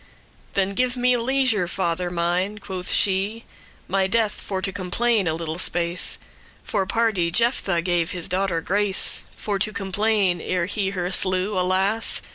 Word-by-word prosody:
"Then 195 0 +1
give 250 +4 0
me 250 0 +3
leisure, 240 -5 +1
father 175 -1 -1
mine, 175 +4 0
quoth 190 -3 -5
she, 200 +4 +1 0.4
"My 190 +1 +1
death 220 +1 +2
for 190 -2 -4
to 195 +1 -1
complain* 200 +2 0
a 160 - +1
little 165 0 -4
space 175 0 0 0.5
*bewail - - -10
For, 190 - +1
pardie, 215 -6 +1
Jephthah 195 -3 +1
gave 175 -2 +1
his 175 -2 -1
daughter 185 -2 0
grace 200 +2 +2
For 205 -2 -3
to 215 +3 +2
complain, 200 -2 0
ere 180 -2 -1
he 200 +1 -1
her 180 -2 -3
slew, 185 +2 +1
alas! 190 +4 +1
190 Hz, 155 wpm, -23 LUFS, 180-210 Hz, 0.5 s, me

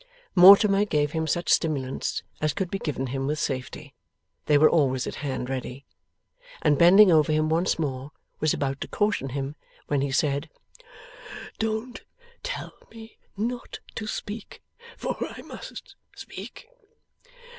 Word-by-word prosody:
Mortimer 200 +2 +8
gave 150 -7 0
him 160 0 -2
such 170 +2 -1
stimulants 135 -5 -1 0.2
as 155 -2 +1
could 190 -3 -2
be 195 - -2
given 140 -6 -3
him 135 +1 -3
with 150 +1 -1
safety 130 -4 -4 0.5
(they 150 - +5
were 155 +2 +7
always 130 -6 +2
at - - -5
hand, 135 -3 -3
ready), 130 +1 -5 0.8
and 145 - +3
bending 190 +3 +8
over 155 -2 +4
him 155 0 +1
once 165 +3 +1
more, 135 -3 -3 0.3
was 155 - +2
about 135 -1 -2
to - - -3
caution 205 -10 0
him, 135 +2 -4 0.3
when 145 -2 +1
he 140 0 -1
said: 140 0 0 1.1
'Don't 220 +3 -3 0.4
tell - - -5 0.2
me 225 -1 -13 0.2
not 240 +4 -4 0.2
to 215 - -5
speak, 215 0 -6 0.3
for - - -3
I - - -7
must - - -10 0.2
speak. 485 - -10
155 Hz, 145 wpm, -26 LUFS, 135-200 Hz, 1.1 s, Mortimer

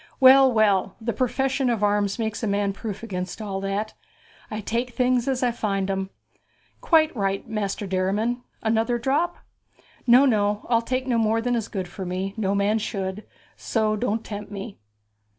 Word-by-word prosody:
'Well, 265 0 +8
well, 205 -4 +2
the 235 0 -2
profession 265 +3 0
of 225 -3 0
arms 205 -1 +1
makes 220 -2 -3
a 225 - -1
man 200 0 0
proof 210 +1 -6
against 185 -4 -5
all 195 -3 -4
that. 200 +2 -2 0.6
I 215 - -4
take 235 +3 -3
things 250 -1 +2
as 260 -1 0
I 245 - +3
find 195 -4 -1
'em.' 190 0 -2 0.7
'Quite 315 -3 +3
right, 195 -2 -1
Master 210 -2 -3
Derriman. 200 +6 0 0.2
Another 225 +2 +1
drop?' 290 +9 0 0.7
'No, 250 +3 +7
no. 210 -4 +1
I'll 230 -1 +4
take 255 +2 -2
no 245 -3 +1
more 225 0 +2
than 245 +2 -1
is 225 -3 -2
good 190 -4 -4
for 190 +2 -7
me 185 +2 -3
no 200 -3 0
man 205 +2 +2
should; 195 -1 -4 0.3
so 215 -2 0
don't 225 0 -1
tempt 205 -1 -7
me.' 200 - -7
215 Hz, 170 wpm, -24 LUFS, 200-240 Hz, 0.7 s, Well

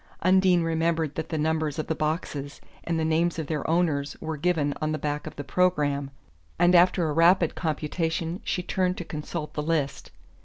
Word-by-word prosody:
Undine 185 -1 +4
remembered 165 -2 0
that 160 - -4
the 160 - -2
numbers 155 -1 0
of 155 - -2
the - - -1
boxes 150 -3 -3 0.3
and 165 -1 -1
the 160 - 0
names 165 +2 +1
of 160 - -2
their 150 0 -3
owners 160 -4 0
were 160 0 -4
given 150 -2 0
on 155 0 0
the 155 - -1
back 150 0 -3
of - - -8
the 145 - -5
programme, 145 -5 +1 0.5
and 175 +1 +4
after 175 -1 +5
a 150 - -1
rapid 170 +1 +4
computation 165 +2 -2
she 180 - -2
turned 185 0 0
to 175 - -5
consult 150 0 -5
the 150 - -2
list. 150 -3 -1
160 Hz, 190 wpm, -26 LUFS, 150-175 Hz, 0.5 s, after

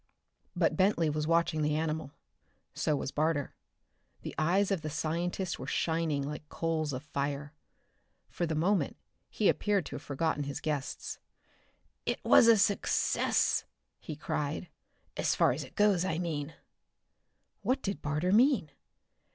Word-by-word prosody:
But - - +2
Bentley 185 -5 +3
was 150 0 -2
watching 165 -1 +2
the 150 0 +1
animal. 155 -2 -2 0.6
So 150 - 0
was 135 - -3
Barter. 155 -2 0 0.7
The - - -5
eyes 185 +7 +2
of 190 -4 0
the 155 - -4
scientist 170 +4 -2
were - - -6
shining 160 -4 0
like 150 +1 -6
coals 160 -2 -1
of 130 +1 -5
fire. 145 0 -3 0.7
For 175 - -2
the 160 - -1
moment 170 -1 +1 0.3
he 210 - +1
appeared 205 -5 +2
to - - -6
have - - -10
forgotten 145 0 -1
his 140 - -4
guests. 145 -3 -3 0.9
"It - - 0
is 230 - +7
a 230 -1 +7
success!" 200 0 +2 0.3
he 155 - -7
cried. 155 +2 -3 0.5
"As - - +1
far - - +4
as - - -3
it - - -13
goes, 205 -4 +4
I 165 -4 -1
mean!" 160 -3 -3 1.1
What 255 - 0
did 200 0 -3
Barter 150 +5 0
mean? 225 - +4
160 Hz, 145 wpm, -31 LUFS, 150-180 Hz, 1.1 s, is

